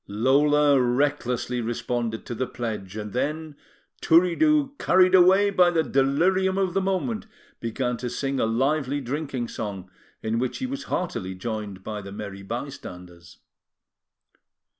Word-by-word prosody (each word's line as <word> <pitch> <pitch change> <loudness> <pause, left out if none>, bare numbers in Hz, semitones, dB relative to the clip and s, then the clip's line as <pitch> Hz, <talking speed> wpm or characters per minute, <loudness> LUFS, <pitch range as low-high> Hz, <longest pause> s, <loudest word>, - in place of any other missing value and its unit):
Lola 140 +5 +3
recklessly 125 -1 0
responded 115 0 -3
to - - -5
the 125 +2 -2
pledge; 110 -5 -5
and 105 -1 -6
then, 150 +4 -2 0.5
Turiddu 270 - +4
carried 185 0 +4
away 190 +2 +6
by 180 -2 +5
the 165 -2 +1
delirium 180 +9 +2
of 190 -3 0
the 195 - +1
moment, 195 +4 -2 0.3
began 125 +1 -2
to 125 +1 -4
sing 135 +2 -2
a 115 - +2
lively 135 +4 0
drinking 135 -2 -3
song, 95 -4 -6 0.3
in 110 +1 0
which 125 0 -2
he 260 - -3
was 275 +2 -5
heartily 95 - -3
joined 105 -1 -5
by 105 0 -5
the 100 0 -9
merry 100 -1 -7
bystanders. 90 -7 -8
130 Hz, 140 wpm, -25 LUFS, 110-170 Hz, 0.5 s, away